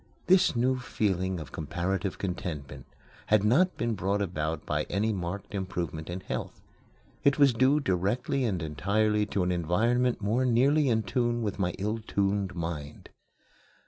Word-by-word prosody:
This 185 -6 +4
new 130 +2 +1
feeling 95 -6 -1
of 75 - -9
comparative 90 +5 -2
contentment 90 -7 -5 0.4
had 105 -2 +4
not 160 - +3
been 115 0 0
brought 100 +1 0
about 80 -4 -3
by 75 0 -1
any 110 +4 0
marked 95 +2 -5
improvement 90 -5 -4
in 90 +2 -4
health. - - -5 0.6
It 140 -1 +4
was 140 -3 +5
due 130 +5 +3
directly 105 +5 0
and 95 -9 -1
entirely 105 +7 +1
to 100 -3 0
an 90 - 0
environment 115 +9 +1
more 110 +5 +1
nearly 135 +4 +3
in 110 -2 +2
tune 120 -1 0
with 105 -2 -3
my 90 -2 0
ill 105 +4 -2
tuned 100 -3 -1
mind. 80 -4 -5
100 Hz, 150 wpm, -28 LUFS, 90-120 Hz, 0.6 s, was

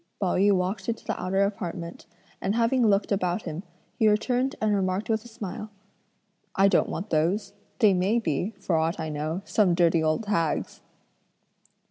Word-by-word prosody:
Pao 190 -3 +1
yü 200 +2 +4
walked 190 +2 -1
into 225 0 -3
the - - -3
outer 190 +2 +1
apartment, 180 -4 -4 0.3
and 195 +2 0
having 235 +1 +3
looked 200 0 +2
about 185 0 0
him, 160 0 -5 0.4
he 220 - +4
returned 250 +5 +1
and 215 -1 +1
remarked 195 +2 0
with 220 0 0
a - - -12
smile: 215 -2 -7 0.9
"I 195 -1 +5
don't 190 - +2
want 210 - -5
those, 190 +6 0 0.2
they 215 -5 +5
may 190 +5 +2
be, 190 0 -1
for 175 - -1
aught 160 +2 0
I 160 -1 -3
know, 155 +5 -3
some 190 -5 +2
dirty 170 -2 +3
old 155 +7 0
hag's." 165 -7 -1
195 Hz, 170 wpm, -26 LUFS, 175-215 Hz, 0.9 s, I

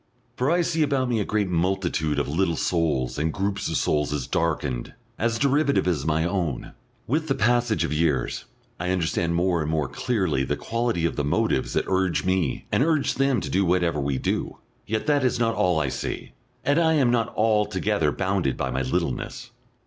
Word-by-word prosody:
For 130 +3 0
I 175 +1 +3
see 165 -1 0
about 140 -4 +1
me 115 -2 +1
a - - +1
great 105 -2 0
multitude 85 -4 0
of 70 - 0
little 85 +3 +1
souls 75 -7 0
and 80 +2 0
groups 100 0 -2
of 80 - 0
souls 75 -1 +1
as 75 -4 -2
darkened, 75 -7 -2 0.2
as 115 0 +1
derivative 140 -2 +2
as 80 -5 0
my 80 +1 +1
own; 85 -8 -2 0.3
with 155 +6 0
the 135 - +1
passage 120 -1 +2
of 75 - -2
years 75 -5 0 0.3
I 90 +1 -2
understand 85 -1 0
more 85 -1 +1
and 75 - -2
more 80 -3 0
clearly 95 - 0
the - - -1
quality 115 -7 -1
of 85 - -1
the 75 - 0
motives 70 - 0
that - - +1
urge 95 -2 +1
me 95 -7 0
and - - +2
urge 155 -2 +2
them 135 -2 +1
to - - -4
do 95 +2 +2
whatever 90 -3 +1
we 70 -1 -1
do.... - - -2 0.3
Yet 110 +1 -1
that 145 -3 +2
is 130 - +2
not 115 -1 +2
all 90 -6 +2
I 75 -3 0
see, - - -5 0.3
and 145 +3 +3
I 160 -1 +3
am 135 -6 +3
not 115 -1 +1
altogether 105 -5 +1
bounded 95 -6 -1
by 65 - -2
my 65 +1 -1
littleness. 65 0 -3
95 Hz, 195 wpm, -25 LUFS, 80-120 Hz, 0.3 s, I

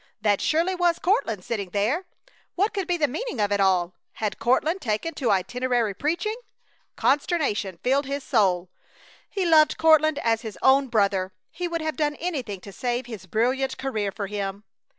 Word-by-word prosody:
That 205 -3 +2
surely 335 +4 +1
was 350 -2 +2
Courtland 230 - 0
sitting 200 -5 -3
there. 220 - 0 0.5
What 400 +5 +1
could 390 -2 -2
be 355 -1 +1
the 300 -3 +2
meaning 315 - -4
of 205 -1 +1
it 200 - +1
all? 185 -2 +2 0.2
Had 215 -2 -3
Courtland 310 +10 +1
taken 220 +9 -2
to 265 -5 -1
itinerary 230 +3 +1
preaching? 340 - -1 0.6
Consternation 270 - 0
filled 270 +2 +2
his 280 0 -3
soul. 185 -9 +1 0.6
He 390 -3 -2
loved 315 -2 +5
Courtland 315 -1 +4
as 225 -1 +2
his 220 -5 -7
own 270 +1 +5
brother. 200 -5 +1 0.2
He 355 0 -3
would 335 -1 -3
have 315 -1 -3
done 295 -1 0
anything 265 - -4
to 200 - -10
save 245 +2 -2
his 215 -6 -9
brilliant 255 +6 0
career 215 -7 -2
for 200 - -4
him. 200 0 -4
250 Hz, 170 wpm, -25 LUFS, 205-315 Hz, 0.6 s, loved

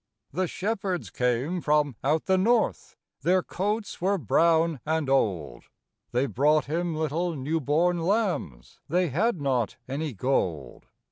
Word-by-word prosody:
The 185 +4 0
shepherds 195 -2 -3
came 125 +8 0
from 150 -4 +2
out 150 +3 +1
the 190 - +3
north, 220 +5 +1 0.2
Their 185 +1 +2
coats 210 +2 -3
were 195 +2 +2
brown 165 - +2
and 160 -1 -1
old, 90 - 0 0.5
They 125 +3 +1
brought 145 +6 +2
Him 165 +2 -2
little 160 +3 -1
new 150 +4 -1
born 170 +5 +2
lambs 175 - -1
They 175 +2 +2
had 190 - +1
not 130 -6 0
any 145 +2 -3
gold. 90 - -2
160 Hz, 135 wpm, -26 LUFS, 135-180 Hz, 0.5 s, the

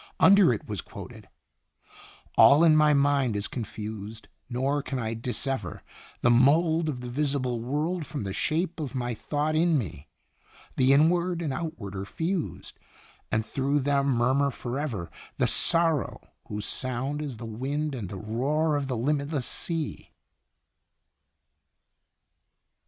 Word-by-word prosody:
Under 200 -2 +7
it 155 - -3
was 105 -4 -3
quoted: - - -11 1.1
"All 145 +4 +7
in 160 -2 +6
my 150 -1 +5
mind 140 -5 +2
is 100 0 -1
confused, 110 -2 -7 0.2
nor 135 +4 0
can 135 - -4
I 115 -2 -2
dissever 125 +3 -3 0.4
The 120 - +4
mould 160 +6 +4
of 125 -4 -4
the 125 - -6
visible 130 -2 -1
world 155 +8 -1
from 145 -8 -4
the 95 -1 -4
shape 165 - -1
of 140 -4 -4
my 120 -1 -2
thought 150 +6 -2
in 165 0 +3
me 85 - -5 0.7
The 130 +1 +4
Inward 170 +4 +3
and 145 -4 -2
Outward 130 - -5
are 95 - -3
fused, 165 - -4 0.5
and 110 0 +1
through 140 +3 0
them 140 0 +1
murmur 130 +2 +2
forever 125 - -4 0.3
The - - +2
sorrow 165 -4 +2 0.2
whose 105 -1 -4
sound 130 +3 -3
is 140 -6 -5
the 115 - -7
wind 140 +7 -3
and 110 -8 -5
the 100 - -6
roar 140 - 0
of 140 -2 -3
the 125 -3 -2
limitless 140 +2 -1
sea." 165 -4 -3
140 Hz, 140 wpm, -27 LUFS, 120-155 Hz, 1.1 s, Under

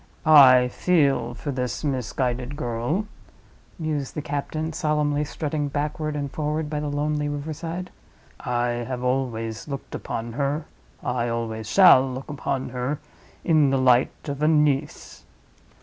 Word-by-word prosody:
"I 130 -5 +8
feel 140 -8 +1
for 145 - -4
this 125 +1 -3
misguided 130 -1 -2
girl," 125 - -2 0.7
mused 150 -4 -3
the 150 - -3
captain, 155 +2 -3
solemnly 150 -2 0
strutting 150 0 -3
backward 150 +1 -2
and 140 -2 -3
forward 150 0 -2
by 150 - -1
the 150 - -3
lonely 150 0 -1
river 145 +2 -4
side. 170 +4 -6 0.5
"I 120 -1 -1
always 125 -3 -2
have 150 - -9
looked 140 - -6
upon 115 0 -4
her—I 140 -3 -3
always 115 -1 -3
shall 135 -9 +7
look 130 +3 -7
upon 140 -2 -3
her—in 140 +4 -1
the 135 - +2
light 130 -1 +4 0.2
of 140 0 -4
a 150 - +3
niece." 150 -2 0
140 Hz, 135 wpm, -24 LUFS, 125-150 Hz, 0.7 s, I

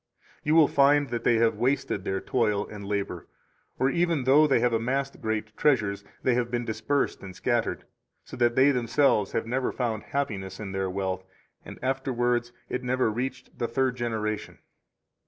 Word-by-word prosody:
You 150 +1 +2
will 160 -3 +7
find 145 0 +4
that 120 -1 -3
they 120 - +4
have 115 0 +2
wasted 125 -6 0
their 95 -1 -1
toil 105 -5 0
and 105 -1 -9
labor, 100 -1 -3 0.5
or 130 +2 +2
even 170 -5 +1
though 145 +4 +6
they 135 - +3
have 120 0 +2
amassed 135 +5 -1
great 110 -1 -3
treasures, 100 -9 +1 0.2
they 130 - +3
have 120 0 0
been 120 0 -2
dispersed 110 +5 -1
and 95 -2 -9
scattered, 120 -2 -1 0.4
so - - -9
that 120 -1 +2
they 135 +2 +6
themselves 125 -4 +2
have 115 - -1
never 125 +3 -1
found 115 -4 -2
happiness 105 -9 -3
in 100 -3 -5
their 95 -1 -1
wealth, 95 -1 -2 0.4
and - - -10
afterwards 125 -2 0 0.2
it 125 - -3
never 125 -2 +1
reached 125 +5 -5
the 120 - 0
third 130 +2 0
generation. 110 -3 -3
120 Hz, 175 wpm, -27 LUFS, 110-135 Hz, 0.5 s, will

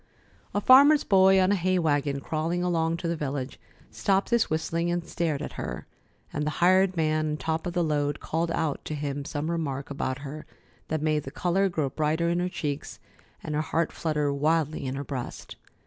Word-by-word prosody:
A - - +3
farmer's 280 +6 +7
boy 190 -1 +5
on 185 +1 +3
a - - +4
hay 185 0 +1
wagon 145 -4 0
crawling 165 +4 -1
along 165 -2 +1
to 170 - -4
the 170 - 0
village 140 -3 -4 0.3
stopped 195 +2 0
his 235 -1 +3
whistling 165 +2 -1
and 175 -1 -1
stared 165 -4 -2
at - - -5
her; 60 0 -5 0.5
and 150 - -1
the 150 - 0
hired 185 +1 +4
man 155 -1 +1
on - - -3
top 160 +2 -2
of 175 - -3
the 175 -1 +1
load 145 -2 0
called 165 +1 -2
out 160 -3 -1
to 155 - -3
him 145 -1 -3
some 155 +2 -3
remark 145 -4 -3
about 130 -2 -2
her 150 +2 -7 0.4
that 155 -1 -2
made 155 -1 +1
the 135 - -8
color 185 +6 +1
grow 155 -5 -1
brighter 155 +3 0
in 170 +1 +1
her 180 +1 0
cheeks 145 -4 -4 0.4
and 150 - -4
her 150 - +1
heart 165 +1 -1
flutter 150 -3 -1
wildly 155 0 0
in 130 - -3
her 140 - -4
breast. 130 -3 -6
160 Hz, 200 wpm, -27 LUFS, 145-175 Hz, 0.5 s, farmer's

